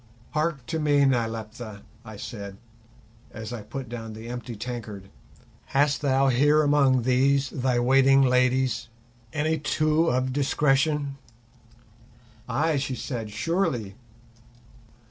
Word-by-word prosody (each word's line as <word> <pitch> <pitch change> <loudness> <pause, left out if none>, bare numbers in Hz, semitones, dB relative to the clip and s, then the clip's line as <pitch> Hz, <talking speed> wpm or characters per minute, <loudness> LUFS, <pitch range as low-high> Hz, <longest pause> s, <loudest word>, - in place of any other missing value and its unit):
"Hark 150 -4 -1
to 160 +6 -3
me, 145 -2 +3
Nyleptha," 115 -3 -2 0.2
I 110 -3 -10
said, 100 -3 -7 0.7
as 110 +1 -7
I 120 - -5
put 130 +5 -7
down 115 -1 -7
the 110 +2 -9
empty 120 -1 -6
tankard. 105 -4 -7 0.7
"Hast 145 +1 +3
thou 135 -1 +3
here 145 +5 +4
among 140 -4 +3
these 135 +2 +2
thy 125 -1 0
waiting 135 +2 +5
ladies 125 -1 +2 0.4
any 155 +2 0
two 155 +2 +1
of 130 -1 0
discretion?" 140 0 +1 1.3
"Ay," 160 0 +1
she 135 -1 -2
said, 120 -5 -5
"surely." 115 - -1
130 Hz, 115 wpm, -26 LUFS, 115-145 Hz, 1.3 s, waiting